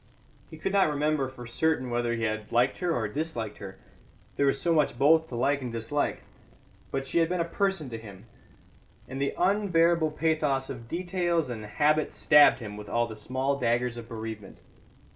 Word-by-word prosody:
He 160 - -10
could 195 +5 -3
not 195 -5 +4
remember 150 -2 0
for 125 -2 -10
certain 130 +1 0
whether 120 0 0
he 115 - -3
had 110 -1 -2
liked 125 +3 +2
her 180 -2 0
or 115 -8 0
disliked 115 -5 -4
her; 95 -2 -9 0.6
there 140 - +2
was 135 - +1
so 170 - +1
much 150 -6 +2
both 160 +4 +4
to 125 - -7
like 140 +4 +1
and 125 -2 -4
dislike. 115 +6 -2 0.7
But 135 0 -3
she 150 - 0
had 165 0 +2
been 180 0 -1
a 170 - +1
person 190 -3 -1
to 115 - -5
him, 100 -4 -12 0.8
and 135 +1 -5
the 140 - -1
unbearable 175 -4 +3
pathos 150 -4 0
of 115 -3 -9
details 175 -2 -1
and 110 -3 -6
habit 150 +8 +1
stabbed 145 -5 +6
him 105 -4 -8
with 105 -1 -9
all 120 0 +1
the 110 -2 -8
small 130 +6 -2
daggers 120 0 0
of 115 -1 -9
bereavement. 110 -3 -7
135 Hz, 190 wpm, -28 LUFS, 115-160 Hz, 0.8 s, stabbed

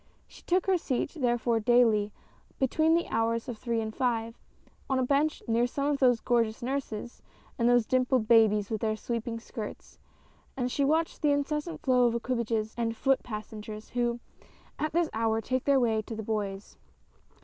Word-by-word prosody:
She - - -16
took 360 +1 +1
her 375 -2 +2
seat 260 -3 -2
therefore 240 -4 +1
daily, 220 -3 +3 0.5
between 315 +5 +2
the 340 - 0
hours 230 +2 0
of 235 -4 -6
three 235 -2 -1
and 220 0 -5
five, 230 -3 -1 0.5
on 265 - +2
a 260 - +1
bench 290 +3 +1
near 235 +1 +2
some 280 +3 -3
one 295 - +2
of 280 - -2
those 245 -3 +4
gorgeous 230 -1 0
nurses 245 -3 -4 0.4
and 235 0 +3
those 245 -2 +4
dimpled 255 -2 +1
babies 215 -3 +4
with 220 - -2
their 215 -1 0
sweeping 230 +1 -4
skirts, 225 -2 -8 0.6
and 250 -1 -1
she 280 - 0
watched 315 +4 +1
the 300 - +3
incessant 300 +3 -2
flow 250 -2 +4
of 235 - 0
equipages 230 -2 -1
and 230 -1 -2
foot 270 -1 +2
passengers 215 -1 -7
who, 240 -1 0 0.6
at 310 0 -1
this 335 -1 +1
hour, 225 0 +1
take 255 +3 -2
their 280 -1 +4
way 225 -3 +1
to 225 +1 -7
the 220 - -5
Bois. 205 -2 -4
240 Hz, 180 wpm, -29 LUFS, 225-270 Hz, 0.6 s, those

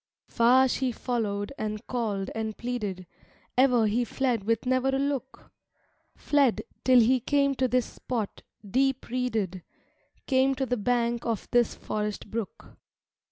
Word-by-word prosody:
IV - - -25
Far 255 +3 +5
she 260 0 0
followed 215 -3 -2
and 215 -1 -4
called 210 -6 -2
and 220 -1 -4
pleaded, 210 -7 -4 0.5
Ever 250 -3 +4
he 220 +4 +1
fled 240 -4 -1
with 230 +2 0
never 255 +1 +1
a 270 - +1
look; 275 -1 -3 0.6
Fled, 280 -5 +2 0.2
till 255 -1 +6
he 250 +3 +4
came 280 +2 +2
to 260 -1 +1
this 250 -1 +1
spot, 230 -5 -5 0.3
deep 265 +5 0
reeded, 220 -7 -2 0.6
Came 265 0 +3
to 265 0 -1
the 250 0 0
bank 235 +1 0
of 230 -3 -2
this 240 -2 +3
forest 210 -1 -4
brook. 225 -3 -6
245 Hz, 145 wpm, -27 LUFS, 215-260 Hz, 0.6 s, till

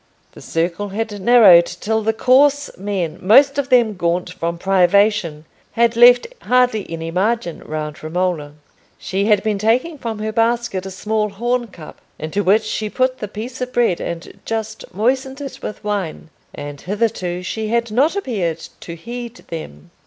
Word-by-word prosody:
The - - -14
circle 170 +5 -2
had 210 0 -4
narrowed 195 -6 +7
till 220 +5 -2
the 220 +1 +1
coarse 280 +5 +3
men—most 205 - +2
of 275 -1 -2
them 240 -4 +4
gaunt 175 0 -1
from 170 -1 -3
privation—had 195 +3 +1
left 245 +1 +7 0.2
hardly 250 -4 +1
any 165 0 -5
margin 195 0 -1
round 150 -1 -6
Romola. 160 -3 -2 0.4
She 195 +1 -2
had 210 -2 +3
been 210 -2 -1
taking 255 +9 +1
from 230 -3 -4
her 215 +1 -3
basket 230 -4 0
a - - -5
small 210 +3 -2
horn 240 +4 -1
cup, 170 -7 -13 0.2
into 160 +7 -2
which 210 +4 +3
she 215 0 -3
put 255 +3 0
the 210 - -4
piece 230 +5 -7
of 250 0 -4
bread 235 -8 +1
and 170 0 -6
just 220 0 -5
moistened 265 +6 -1
it 280 -2 -7
with 210 - -7
wine; 195 -6 -4 0.2
and 145 -1 -8
hitherto 190 -3 -2
she 220 +4 -3
had 235 0 0
not 280 - +2
appeared 190 - -3
to 170 - -8
heed 235 +6 -7
them. 75 - -8
210 Hz, 160 wpm, -19 LUFS, 180-235 Hz, 0.4 s, narrowed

